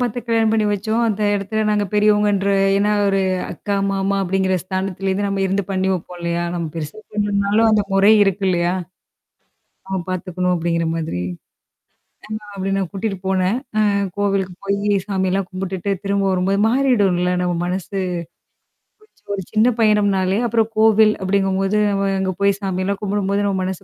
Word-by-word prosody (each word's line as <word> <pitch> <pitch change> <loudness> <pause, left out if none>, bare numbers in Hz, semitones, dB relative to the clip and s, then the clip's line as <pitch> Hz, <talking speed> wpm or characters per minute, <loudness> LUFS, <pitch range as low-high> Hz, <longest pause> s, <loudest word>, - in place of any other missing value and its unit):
பார்த்து 245 -1 -1
கல்யாணம் 225 -1 +2
பண்ணி 220 -1 +2
வச்சோம். 215 +3 -1
அந்த 215 -1 -1
இடத்துல 205 +2 -1
நாங்க 210 -1 +1
பெரியவங்கன்ற 210 -1 +3 0.3
ஏன்னா 205 +1 +2 0.2
ஒரு 195 0 +1 0.3
அக்கா, 205 - -3 0.2
மாமா 195 0 0
அப்படிங்கிற 190 0 0
ஸ்தானத்துல 190 +1 -3
இருந்து 200 +2 0
நம்ம 195 0 -2
இருந்து 195 +2 0
பண்ணி 190 0 0
வைப்போம் 180 0 -5
இல்லையா? 170 0 -1
நம்ம 170 -1 -2
பெருசா 155 +3 -6 0.2
பண்ணலனாலும் 205 +1 +2
அந்த 215 -1 +3
முறை 195 +2 +5
இருக்குல்லையா? 185 -3 +1 1.2
ஆ, - - -10 0.2
பார்த்துக்கணும் 180 0 -1
அப்படிங்கிற 170 0 -1
மாதிரி. 155 - -3 1.2
ஆமா, 210 - -16
அப்படி 195 0 -2
நான் 190 -3 -2
கூட்டிட்டுப் 195 -2 -4
போனேன். 190 +4 +1 0.6
கோவிலுக்குப் 195 -3 -1
போயி 200 +1 +1
சாமியெல்லாம் 190 -1 0
கும்பிட்டுட்டு 190 +1 -3
திரும்ப 200 0 +1
வரும்போது 190 +2 +1
மாறிடும்ல 205 -9 +2
நம்ம 180 -1 0
மனசு. 185 +2 -3 1.0
ஒரு 430 - -25
சி - - -39
ஒரு 195 - -4
சின்ன 220 +2 +4
பயணம்னாலே, 200 -2 +2
அப்புறம் 225 -1 +1
கோவில் 220 -1 +5
அப்படிங்கும்போது 195 +1 +1
நம்ம 195 0 0
அங்க 190 0 -1
போயி 200 0 +4
சாமியெல்லாம் 195 +1 -2
கும்பிடும்போது 200 0 0
நம்ம 195 -1 0
மனசு 185 -1 -4
195 Hz, 150 wpm, -20 LUFS, 185-205 Hz, 1.2 s, முறை